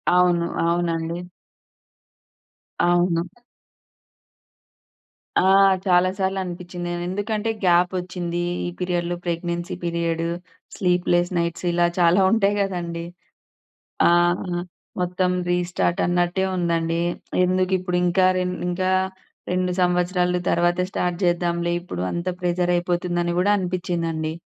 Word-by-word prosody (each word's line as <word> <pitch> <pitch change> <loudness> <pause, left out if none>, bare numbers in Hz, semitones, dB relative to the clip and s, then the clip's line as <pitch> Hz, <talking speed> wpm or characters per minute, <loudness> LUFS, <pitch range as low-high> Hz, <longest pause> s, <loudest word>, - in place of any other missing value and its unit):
అవును. 175 -1 +3 0.2
అవునండి. 170 -1 -1 1.7
అవును. 175 -1 +1 2.0
ఆ! - - +5 0.4
చాలా 180 -1 +4
సార్లు 190 0 0
అనిపిచ్చింది. 175 0 -6
నేనెందుకంటే 205 +5 -2 0.2
గ్యాపొచ్చింది. 180 0 +1 0.3
ఈ - - -2
పీరియడ్‌లో 175 -1 -1
ప్రెగ్నెన్సీ 170 0 -3
పీరియడు, 170 -1 -1 0.5
స్లీప్‌లెస్ 180 -1 +1
నైట్స్ 170 +1 -2
ఇలా 175 0 +2
చాలా 175 +2 +5
ఉంటాయి 205 -2 +3
గదండీ! 170 -3 -3 1.0
ఆ! - - +5 0.9
మొత్తం 180 +1 0 0.2
రీస్టార్ట్ 175 0 0
అన్నట్టే 175 +2 +1
ఉందండి. 170 -1 0 0.4
ఎందుకిప్పుడు 185 0 0
ఇంకా 180 +1 +3
రెండు 180 0 -2
ఇంకా 185 +1 0 0.6
2 180 0 0
సంవత్సరాలు 180 0 +1
తర్వాత 175 +1 +2
స్టార్ట్ 180 -2 -1
జేద్దాంలే 175 0 +1
ఇప్పుడు 90 - -6
అంత 170 +1 -4
ప్రెషర్ 180 0 +1
అయిపోతుందని 175 0 -1
గూడా 200 +3 +3
అనిపిచ్చిందండి. 170 -3 -2
175 Hz, 95 wpm, -23 LUFS, 170-180 Hz, 2.0 s, ఆ